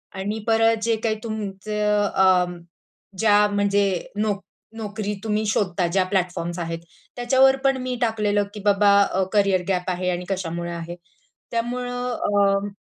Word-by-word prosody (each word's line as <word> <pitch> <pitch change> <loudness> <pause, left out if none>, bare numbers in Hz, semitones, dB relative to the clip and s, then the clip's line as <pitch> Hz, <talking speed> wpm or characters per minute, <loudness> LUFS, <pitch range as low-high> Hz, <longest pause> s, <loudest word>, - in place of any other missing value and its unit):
आणि 205 +3 -3
परत 225 0 +3
जे 230 0 +2
काही 220 -1 +1
तुमचं 210 -1 -1
अ, 185 -1 +5 0.7
ज्या 210 -1 +5
म्हणजे 205 0 +2 0.3
नो 215 0 +1 0.4
नोकरी 210 -1 -4
तुम्ही 215 0 0
शोधता 185 -4 0
ज्या 185 +2 +2
प्लॅटफॉर्म्स 180 -2 -2
आहेत, 165 0 -4 0.4
त्याच्यावर 260 +2 +4
पण 270 -1 +3
मी 255 0 -3
टाकलेलं, 210 -3 +1
की 210 - -7
बाबा 205 0 +4
अ, 190 -1 0
कॅरियर 200 -3 +3
गॅप 180 -1 0
आहे 180 0 -2
आणि 180 0 -4
कशामुळे 175 -2 -3
आहे. 170 +1 -6 0.6
त्यामुळं 245 +1 -2
अ, 200 -3 +1
205 Hz, 140 wpm, -23 LUFS, 185-220 Hz, 0.7 s, अ